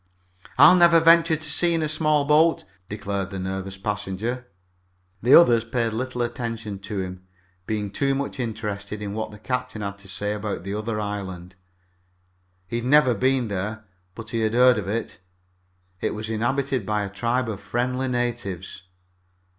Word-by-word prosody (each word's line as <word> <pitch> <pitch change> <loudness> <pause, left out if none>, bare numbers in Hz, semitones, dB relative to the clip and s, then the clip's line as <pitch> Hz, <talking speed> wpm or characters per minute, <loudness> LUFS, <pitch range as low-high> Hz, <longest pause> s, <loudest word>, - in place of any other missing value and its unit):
"I'll - - +9
never 170 -2 +6
venture 165 0 +5
to 155 - -8
sea 170 +2 +1
in 160 - 0
a - - 0
small 155 -1 +1
boat!" 155 +3 +4 0.3
declared 100 -2 -3
the 95 - -6
nervous 95 +1 -4
passenger. 105 +5 -3 0.7
The 125 +5 +6
others 120 -9 +6
paid 115 -1 -1
little 125 +1 -2
attention 115 -4 -4
to 100 0 -4
him, 90 0 -9 0.4
being 105 -2 -2
too 135 +3 0
much 140 0 -4
interested 105 -3 -4
in 100 -1 -4
what 110 +1 -3
the 105 - -12
captain 125 -1 -3
had 100 0 -5
to 100 - -14
say 105 +2 -3
about 105 -3 -4
the 100 +1 -4
other 105 +1 -3
island. 95 -4 -5 1.1
He 115 - -3
had 120 - -4
never 140 -1 +5
been 130 +2 +1
there, 105 +3 -4 0.3
but 115 -1 -9
he 115 - -1
had 110 0 0
heard 125 -2 +6
of 100 - -6
it. 110 +3 -3 0.8
It - - -1
was 110 +1 -5
inhabited 130 +3 0
by 105 +1 -1
a - - -3
tribe 120 +4 -1
of 105 -3 -4
friendly 125 +2 -1
natives. 120 -8 -3
115 Hz, 170 wpm, -24 LUFS, 100-130 Hz, 1.1 s, I'll